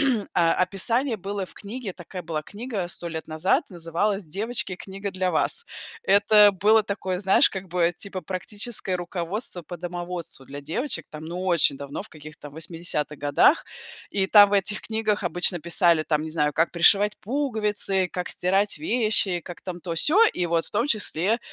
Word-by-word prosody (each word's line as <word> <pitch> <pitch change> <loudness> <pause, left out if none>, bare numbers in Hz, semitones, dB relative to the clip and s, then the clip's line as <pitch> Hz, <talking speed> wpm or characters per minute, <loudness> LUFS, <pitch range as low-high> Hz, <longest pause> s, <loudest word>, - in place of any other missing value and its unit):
э, 250 -8 +2
описание 195 +8 +1
было 195 +1 -4
в - - -13
книге, 210 -1 -7
такая 180 +1 -9
была 160 -2 -3
книга 210 -1 -5
100 175 -1 -6
лет 160 -1 -6
назад, 185 - +1
называлась 180 +4 -2
"Девочки, 195 +3 -2
книга 195 +1 -6
для 185 -1 -1
вас". 470 - -1 0.4
Это 205 - +6
было 215 +3 +4
такое, 190 -3 -3
знаешь, 195 -1 +5
как 190 -1 -7
бы, 175 0 +1
типа 195 -2 -5
практическое 195 +3 -3
руководство 175 +3 -4
по 175 +3 -8
домоводству 175 -4 -6
для 140 +1 -8
девочек, 245 - -2
там, 155 0 -9
ну 180 +3 -5
очень 165 -6 +3
давно, 140 +5 -6
в - - -11
каких-то 155 -1 -11
80-х 160 -1 -3
годах. 145 - +3 0.5
И 195 -1 +1
там 205 0 +8
в - - -6
этих 200 +2 +1
книгах 220 -2 -1
обычно 175 0 +2
писали, 170 -1 +3
там, 155 -1 0
не 160 - -5
знаю, 150 -2 +1
как 165 +2 +1
пришивать 200 +4 +4
пуговицы, 210 -7 +1
как 180 -1 -3
стирать 195 +3 +1
вещи, 215 - +2
как 175 -1 -10
там 180 -2 -6
то-сё. 295 - +3
И 180 - -1
вот 165 0 0
в - - -5
том 235 +6 0
числе 215 - +1
185 Hz, 170 wpm, -24 LUFS, 170-210 Hz, 0.5 s, там